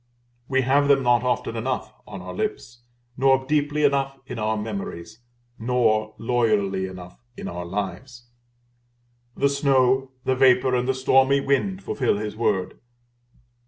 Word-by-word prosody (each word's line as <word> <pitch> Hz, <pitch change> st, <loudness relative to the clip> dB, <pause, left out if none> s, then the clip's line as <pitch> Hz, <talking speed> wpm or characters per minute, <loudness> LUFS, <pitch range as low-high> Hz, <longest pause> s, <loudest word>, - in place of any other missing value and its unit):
We 135 Hz, -1 st, +2 dB
have 140 Hz, +3 st, +3 dB
them 140 Hz, -1 st, +4 dB
not 120 Hz, -1 st, +3 dB
often 125 Hz, -2 st, -1 dB
enough 125 Hz, +3 st, -3 dB
on -, -, -8 dB
our -, -, -7 dB
lips, 405 Hz, -, -4 dB, 0.4 s
nor 135 Hz, 0 st, +3 dB
deeply 150 Hz, +1 st, 0 dB
enough 135 Hz, -1 st, +1 dB
in 125 Hz, -4 st, -7 dB
our 110 Hz, +1 st, 0 dB
memories, 105 Hz, -1 st, -6 dB, 0.4 s
nor 110 Hz, -3 st, +1 dB
loyally 105 Hz, -5 st, 0 dB
enough 90 Hz, -1 st, -11 dB, 0.2 s
in -, -, -6 dB
our 90 Hz, 0 st, -5 dB
lives. 105 Hz, +7 st, -5 dB, 1.1 s
The 140 Hz, -, +3 dB
snow, 135 Hz, -2 st, +2 dB, 0.2 s
the 130 Hz, -, +2 dB
vapor, 130 Hz, 0 st, +4 dB
and 125 Hz, 0 st, 0 dB
the 130 Hz, -, +1 dB
stormy 135 Hz, +1 st, +3 dB
wind 165 Hz, +9 st, 0 dB
fulfil 125 Hz, -6 st, 0 dB
His 105 Hz, 0 st, -5 dB
word. 105 Hz, -5 st, -1 dB
125 Hz, 140 wpm, -23 LUFS, 110-135 Hz, 1.1 s, them